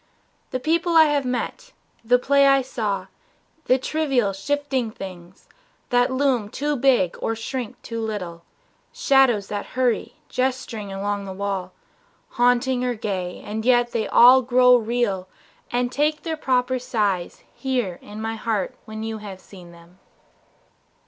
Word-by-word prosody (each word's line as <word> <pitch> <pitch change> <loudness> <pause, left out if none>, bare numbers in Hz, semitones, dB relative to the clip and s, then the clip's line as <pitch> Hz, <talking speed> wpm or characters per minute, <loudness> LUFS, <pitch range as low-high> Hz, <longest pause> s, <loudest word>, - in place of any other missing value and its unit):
The 255 - -3
people 335 +5 +1
I 320 - +9
have 295 -3 +1
met, 250 - -4 0.3
The 245 +2 +4
play 280 +2 +4
I 275 -1 +4
saw, 215 -6 -3 0.6
the 255 - +4
trivial, 265 -7 0
shifting 270 +3 -1
things 185 -4 -10 0.4
That 245 +1 +3
loom 260 -5 +1
too 295 +6 -2
big 245 -9 +2
or 225 - -1
shrink 245 +1 -5
too 230 -1 -5
little, 180 -6 -5 0.5
shadows 270 - +3
That 205 -1 -4
hurry, 250 -3 0
gesturing 250 -5 -2
along 200 +1 -3
a 190 - -5
wall, 190 -2 -3 0.6
Haunting 245 +1 +2
or 250 -1 0
gay 190 -5 -4
and 220 +1 -4
yet 240 0 +3
they 220 -2 -1
all 255 +2 +7
grow 250 0 +5
real 225 -5 0 0.4
And 245 0 0
take 300 +3 0
their 325 -1 -2
proper 255 -3 0
size 205 -7 -2
here 245 -10 -2
in 210 +1 -10
my 225 +1 -3
heart 215 -4 -2
When 220 0 -7
you 220 0 -4
have 200 -3 -9
seen 180 -3 -14
them. 170 +2 -18
240 Hz, 145 wpm, -23 LUFS, 205-260 Hz, 0.6 s, I